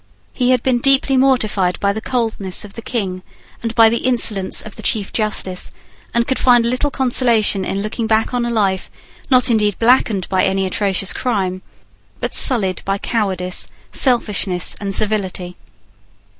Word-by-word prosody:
He 250 -1 0
had 255 -2 +2
been 255 -2 +1
deeply 270 +1 +3
mortified 220 -9 +1
by 200 0 +1
the 220 - -5
coldness 220 -7 -2
of 200 - -12
the 230 - -8
King 195 -6 -3 0.4
and 230 -1 -4
by 225 -1 +7
the 235 +1 +1
insolence 225 -6 +1
of 215 - -10
the - - -9
Chief 210 -4 -2
Justice, 210 -4 -1 0.4
and 235 0 +1
could 265 - -1
find 245 -2 +4
little 255 +5 0
consolation 240 -7 +2
in 195 +1 -3
looking 220 +2 -3
back 220 +2 +1
on 245 -1 0
a 240 - -2
life, 200 -5 -1 0.4
not 255 -1 +4
indeed 210 -3 +1
blackened 225 -5 +2
by 190 -1 +1
any 190 0 +1
atrocious 195 0 0
crime, 190 -7 -2 0.6
but - - -3
sullied 195 - +3
by 195 0 -1
cowardice, 190 -5 -1 0.2
selfishness, 210 -8 +1
and 195 -1 -2
servility. 190 -4 -1
215 Hz, 160 wpm, -17 LUFS, 195-240 Hz, 0.6 s, by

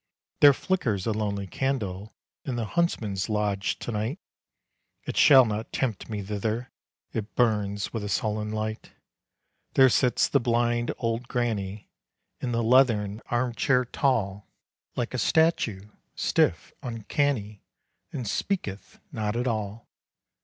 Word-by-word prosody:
There 145 - +9
flickers 130 - -1
a 115 - +1
lonely 105 -2 -2
candle 105 -4 -3 0.3
In 130 - -3
the 115 -2 -1
huntsman's 105 - -1
lodge 105 -2 0
to - - -5
night. 110 - -2 0.9
It - - -5
shall 135 -4 +8
not 110 0 -3
tempt 115 -7 -2
me 105 -2 -3
thither; 110 +4 -3 0.4
It 110 -1 -4
burns 105 -4 +1
with 115 -3 -3
a 105 - -4
sullen 105 0 -1
light. 110 0 -4 0.8
There 135 -1 +7
sits 125 0 +3
the 140 - +3
blind 120 0 +1
old 115 +1 -2
granny, 105 -5 -2 0.5
In 125 - -2
the 115 0 0
leathern 110 -4 +3
arm 120 0 0
chair 125 +1 +2
tall, 105 -7 0 0.5
Like 120 0 -2
a 130 - -1
statue, 115 - +2 0.3
stiff, - - +1
uncanny 115 -2 -2 0.5
And 125 -5 -4
speaketh 100 - -3
not 105 0 -2
at 120 +1 -1
all. 110 -1 -3
115 Hz, 130 wpm, -27 LUFS, 105-125 Hz, 0.9 s, There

